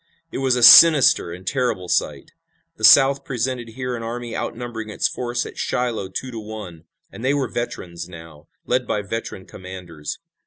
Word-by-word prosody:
It - - -5
was 130 -2 +1
a 125 - 0
sinister 135 - +8
and 90 +2 -10
terrible 125 -9 -2
sight. - - -2 0.5
The - - -13
South 140 0 +6
presented 125 -1 -3
here 125 -1 -4
an 115 - -6
army 115 0 -6
outnumbering 115 -2 -5
its - - 0
force 120 0 -3
at - - -10
Shiloh 115 -6 -2
two 130 +7 -6
to 115 - -7
one, 105 -7 -9 0.3
and 115 - -10
they 135 +2 +1
were 135 -3 -1
veterans 85 -8 -6
now, 80 -3 -13 0.2
led 125 -1 -1
by 105 - -2
veteran 100 -2 -6
commanders. 90 -5 -9
115 Hz, 170 wpm, -21 LUFS, 95-125 Hz, 0.5 s, sinister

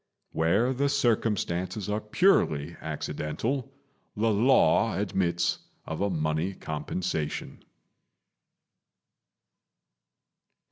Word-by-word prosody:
Where 100 +11 +2
the 140 +2 +1
circumstances 105 -7 0
are 105 +1 -1
purely 85 - +2
accidental, 80 - -3 0.5
the 110 +1 +2
law 115 -1 +4
admits 85 -3 0 0.3
of 80 +2 -5
a 100 - +1
money 80 +2 -1
compensation. 80 0 -4
95 Hz, 75 wpm, -28 LUFS, 80-115 Hz, 0.5 s, law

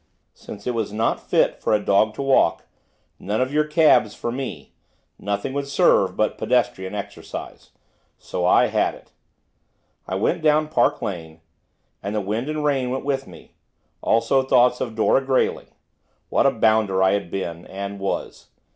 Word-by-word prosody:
Since - - -11
it 125 - -1
was 110 -3 -2
not 110 +2 0
fit - - 0
for - - +2
a - - +1
dog 105 +2 +2
to 140 - -4
walk, 135 -11 +3 0.6
none 105 +2 -2
of 130 +2 -1
your 150 0 +2
cabs 150 -9 +3
for 120 - -4
me, 130 +2 -6 0.5
nothing 100 +6 -3
would 140 0 -3
serve 140 - +3
but 110 - 0
pedestrian 120 -6 0
exercise. 100 - -8 0.5
So - - -5
I - - +5
had - - 0
it. - - -19 1.0
I 95 - -3
went 100 +10 0
down 155 0 +2
Park 120 -5 +1
Lane, 80 -4 -6 0.6
and 100 +2 -4
the - - +1
wind 110 +8 -3
and 155 -1 -2
rain 135 -4 +1
went 130 +2 -3
with 135 -1 -1
me, - - -15 0.5
also, 115 +4 +2
thoughts 125 -1 +3
of 115 -3 -3
Dora 115 +4 +2
Grayling. 130 -1 0 0.6
What - - +3
a - - +4
bounder 110 -5 +2
I 95 - +4
had 100 -3 -1
been, 85 -3 -5
and 100 +1 -6
was! 95 0 -4
115 Hz, 165 wpm, -22 LUFS, 100-135 Hz, 1.0 s, I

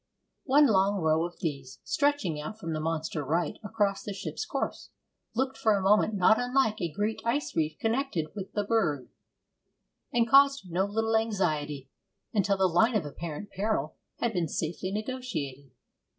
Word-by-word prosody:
One 290 +2 +6
long 200 -4 +3
row 160 0 +2
of 175 - -16
these, 140 -5 -4
stretching 285 - 0
out 155 +8 -6
from 165 -7 -4
the 155 - -2
monster 160 -1 -2
right 160 +3 -1
across 205 -2 0
the 205 - -5
ship's 205 - -5
course, - - -3 0.5
looked 265 +2 0
for 220 -2 +3
a - - -1
moment 210 +2 +4
not 200 +3 +5
unlike 245 -4 +1
a 170 -2 -1
great 210 +5 -2
ice 260 +5 -1
reef 155 -1 0
connected 225 - -1
with 195 -2 -6
the 205 - 0
berg, 175 - 0 1.0
and 235 -1 +2
caused 275 -6 +5
no 185 +3 +1
little 225 +2 0
anxiety 155 - -1 0.4
until 200 -2 +2
the 190 - +3
line 220 +7 +3
of 195 -7 +1
apparent 165 +6 -6
peril 195 -7 -1 0.2
had 235 -1 -1
been 175 -4 0
safely 170 +5 -3
negotiated. 200 - -4
195 Hz, 165 wpm, -29 LUFS, 160-225 Hz, 1.0 s, One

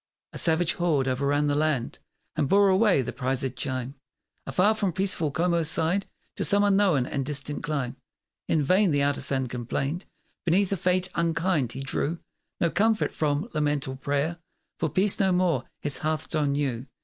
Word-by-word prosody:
A - - -3
savage 170 +1 +2
horde 155 -7 +1
o'erran 140 +3 +1
the 145 - +1
land 150 -5 0 0.4
And 145 -3 0
bore 200 0 +5
away 190 -6 +4
the - - -5
prizéd 130 -1 -2
chime; 130 0 -3 0.5
Afar 205 +4 +3
from 210 -4 -1
peaceful 185 -4 +1
Como's 170 +1 +1
side, 175 +5 0 0.3
To - - -1
some 205 0 +3
unknown 195 -9 +3
and 135 +1 -2
distant 145 +1 -4
clime. 145 -6 -3 0.5
In 155 -2 +2
vain 185 +7 +3
the 145 -2 +2
artisan 140 -2 0
complained 130 +7 -3 0.4
Beneath 185 +3 +2
a - - +2
fate 180 +2 +1
unkind; 165 -6 0
he 135 - -6
drew 145 +4 -2 0.4
No 170 - +2
comfort 220 +1 +2
from 150 +4 0
lament 150 -2 0
or 130 - -4
prayer, 145 +5 -1 0.4
For 160 - 0
peace 190 +7 +2
no 190 -2 +3
more 180 -2 +1 0.2
his 145 -1 -2
hearthstone 155 -1 -1
knew. 135 -3 -2
155 Hz, 165 wpm, -26 LUFS, 140-180 Hz, 0.5 s, bore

